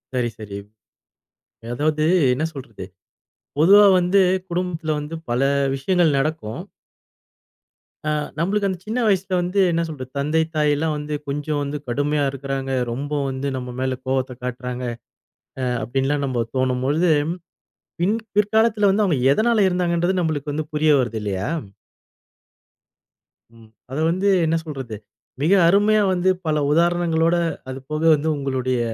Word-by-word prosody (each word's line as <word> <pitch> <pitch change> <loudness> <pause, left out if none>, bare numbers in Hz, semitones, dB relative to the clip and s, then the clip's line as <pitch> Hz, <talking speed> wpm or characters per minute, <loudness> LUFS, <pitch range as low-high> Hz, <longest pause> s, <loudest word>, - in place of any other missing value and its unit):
சரி, 120 -2 0
சரி. 100 -2 -7 1.2
அதாவது 155 +3 0 0.3
என்ன 135 +5 -2
சொல்றது? 125 -9 -8 0.7
பொதுவா 200 +6 +7
வந்து 180 +2 +3 0.3
குடும்பத்துல 170 -3 -2
வந்து 150 +2 -6 0.2
பல 120 +1 +1 0.3
விஷயங்கள் 165 +2 +2
நடக்கும். 135 -6 -2 1.5
ஆ, - - +1 0.3
நம்பளுக்கு 200 +4 +1
அந்தச் 185 -2 -5
சின்ன 225 +4 -2
வயசுல 195 -2 +1
வந்து 180 +3 -1
என்ன 165 0 +1
சொல்றது 130 -5 -8
தந்தை, 150 +3 +1
தாய் 150 -1 +3
எல்லாம் 155 +2 -1
வந்து 150 0 -5
கொஞ்சம் 145 +1 -2
வந்து 145 +1 -3
கடுமையா 145 +4 0
இருக்காங்க. 135 0 -4 0.2
ரொம்ப 140 +5 -5 0.2
வந்து 135 +1 -3
நம்ம 125 -1 -6
மேல 130 0 -1
கோபத்தை 130 -1 -1
காட்டுறாங்க 125 0 -4 1.0
அப்படின்னு 135 +4 -1
எல்லாம் 145 0 0
நம்ம 125 -3 -1
தோணும் 130 -1 0
போது 160 +5 +2 0.9
பின் 200 +6 +2 0.2
பிற்காலத்தில் 215 0 +3
வந்து 205 +2 +2
அவங்க 170 -7 +1 0.2
எதனால 220 +3 +2
இருந்தாங்கன்றது 180 0 0
நம்மளுக்கு 150 -3 -2
வந்து 155 +1 -2
புரிய 155 0 +3
வருது 120 -3 -1
இல்லையா? 100 -2 -3 2.1
ம், 115 -1 -17 0.2
அதை 140 +4 -2
வந்து 185 +3 0 0.2
என்ன 160 +1 +1
சொல்றது 135 -7 -6 0.5
மிக 155 +5 +2 0.2
அருமையா 205 +4 +4
வந்து 180 +1 +1 0.2
பல 155 -1 +1
உதாரணங்களோட, 170 0 +2 0.3
அது 130 0 -5
போக 155 0 -2
வந்து 150 +2 -3
உங்களுடைய 130 -2 -1
150 Hz, 135 wpm, -22 LUFS, 130-175 Hz, 2.1 s, பொதுவா